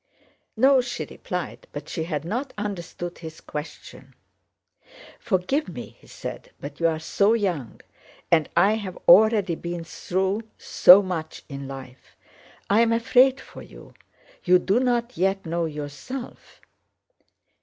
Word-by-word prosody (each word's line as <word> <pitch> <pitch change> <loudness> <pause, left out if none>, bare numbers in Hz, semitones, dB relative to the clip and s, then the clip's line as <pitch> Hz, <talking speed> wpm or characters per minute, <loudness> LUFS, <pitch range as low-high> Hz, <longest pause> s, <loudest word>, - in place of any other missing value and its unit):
"No," 265 +2 +5
she 245 - -5
replied, - - -6
but - - -7
she 160 -3 -4
had 155 -3 -4
not 245 +10 -3
understood 175 -4 -5
his 160 -1 -9
question. 150 +1 -9 1.0
"Forgive 225 - 0
me!" - - -9
he - - -20
said. - - -8
"But 145 0 -9
you 165 - +3
are 160 -1 0
so 200 +7 +2
young, 180 - -2 0.5
and 160 -2 +3
I 195 +4 +5
have 195 -4 -6
already 205 -1 +6
been 170 +1 -5
through 190 +5 -2 0.2
so 190 +3 +7
much 165 -4 -5
in 140 -1 -7
life. 135 -1 -11 0.5
I 210 +3 +4
am 230 -1 +3
afraid 255 +3 +4
for - - -12
you, - - -14 0.5
you 180 0 +5
do 195 +5 +1
not 245 -1 0
yet 195 +1 0
know 170 +1 -1
yourself." 150 - -8
185 Hz, 135 wpm, -24 LUFS, 160-225 Hz, 1.0 s, so